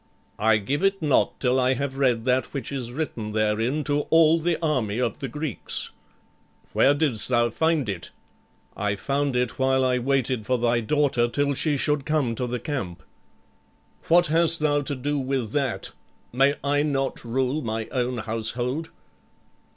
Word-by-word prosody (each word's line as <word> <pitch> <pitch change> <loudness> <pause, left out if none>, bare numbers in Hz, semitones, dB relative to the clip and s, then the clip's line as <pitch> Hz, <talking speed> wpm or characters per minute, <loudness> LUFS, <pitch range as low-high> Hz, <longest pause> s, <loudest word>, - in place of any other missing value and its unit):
"I 110 +1 +4
give 135 - -2
it 195 0 +2
not 145 -3 +2
till 130 0 +2
I 130 +1 +2
have 140 +1 -3
read 125 -4 +2
that 130 +2 0
which 135 -2 -4
is 125 -4 -4
written 120 -7 -4
therein 110 +7 0
to 145 0 0
all 165 0 +5
the 170 +1 0
army 130 -10 -1
of 120 -4 -1
the 140 - -3
Greeks." 150 0 -2 0.8
"Where 140 +2 +4
didst 145 -8 +2
thou 120 -1 +2
find 160 0 +1
it?" 95 -5 -4 0.7
"I 105 0 -1
found 140 +4 -1
it 125 -1 -1
while 130 0 +2
I 125 -1 +1
waited 130 -3 0
for 130 - +2
thy 120 0 +1
daughter 130 0 +1
till 140 +3 0
she 145 +1 0
should 150 0 0
come 150 -5 0
to 125 +2 -3
the 125 0 -3
camp." 100 - -5 1.0
"What 175 +1 +5
hast 165 +1 +3
thou 145 -1 +2
to 140 0 -3
do 145 +3 -2
with 130 -4 -2
that? 135 -4 -1 0.4
May 135 +3 +3
I 145 +1 +2
not 135 -2 -1
rule 130 +5 -1
my 110 -3 -3
own 125 -1 -1
household?" 120 +7 -2
130 Hz, 165 wpm, -24 LUFS, 120-145 Hz, 1.0 s, all